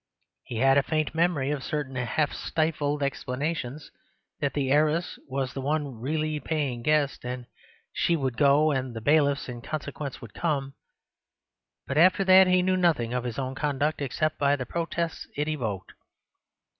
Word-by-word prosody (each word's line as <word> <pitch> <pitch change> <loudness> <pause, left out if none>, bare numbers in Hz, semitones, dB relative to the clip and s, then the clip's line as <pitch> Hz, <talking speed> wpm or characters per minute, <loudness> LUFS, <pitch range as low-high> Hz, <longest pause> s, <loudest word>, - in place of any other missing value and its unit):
He 120 - -7
had 135 +3 +5
a - - +3
faint 155 +1 -1
memory 160 -4 +1
of 145 -2 -3
certain 145 -3 -3
half 125 +5 0
stifled 150 -2 -1
explanations, 140 +1 -3 0.5
that 140 - -1
the 135 -2 0
heiress 155 +4 +2
was 135 -1 -2
the 135 - -4
one 145 -3 -2
really 155 +3 -1
paying 145 -7 -2
guest, 150 +1 +1
and 125 0 -5 0.5
she 170 - +2
would 135 -6 -1
go, 145 +3 +4
and 130 -3 -2
the - - -3
bailiffs 145 +2 +2
(in 120 -2 -7
consequence) 150 -1 -5
would 115 - -11
come; 140 -5 -1 1.1
but 135 +2 0
after 185 +3 +5
that 190 0 +7
he 180 0 +4
knew 185 0 +2
nothing 155 -10 +2
of 125 -1 -2
his 120 -2 -4
own 130 -1 -2
conduct 145 +2 -1
except 155 +3 -1
by 140 0 +3
the 130 -2 -4
protests 170 +3 -3
it 150 +1 0
evoked. 115 -11 -3
145 Hz, 165 wpm, -27 LUFS, 130-155 Hz, 1.1 s, that